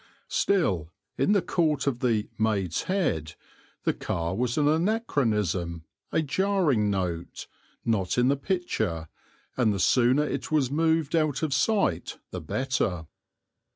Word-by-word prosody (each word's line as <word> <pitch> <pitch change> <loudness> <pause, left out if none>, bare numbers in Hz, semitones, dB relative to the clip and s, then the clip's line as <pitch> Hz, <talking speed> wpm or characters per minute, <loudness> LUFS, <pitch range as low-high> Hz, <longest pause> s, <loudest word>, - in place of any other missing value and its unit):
Still, 95 - +1 0.2
in 205 - +2
the 200 - +3
court 155 -5 +1
of 135 -4 0
the 115 -4 +1
"Maid's 100 -6 0
Head," 80 - 0 0.5
the - - +2
car 85 +1 -3
was 120 +3 -1
an 145 -1 +3
anachronism, 115 - 0 0.3
a 160 - +1
jarring 155 - +1
note, 90 -4 -3 0.4
not 105 -5 0
in 125 +1 +4
the 140 - +3
picture, 135 - -2 0.5
and 120 -4 +3
the 100 - -2
sooner 125 +8 +4
it 135 -1 -4
was 140 -5 +2
moved 160 0 +1
out 155 -2 +1
of 155 -3 0
sight 190 - +1
the - - -5
better. 95 - -1
130 Hz, 135 wpm, -27 LUFS, 95-160 Hz, 0.5 s, in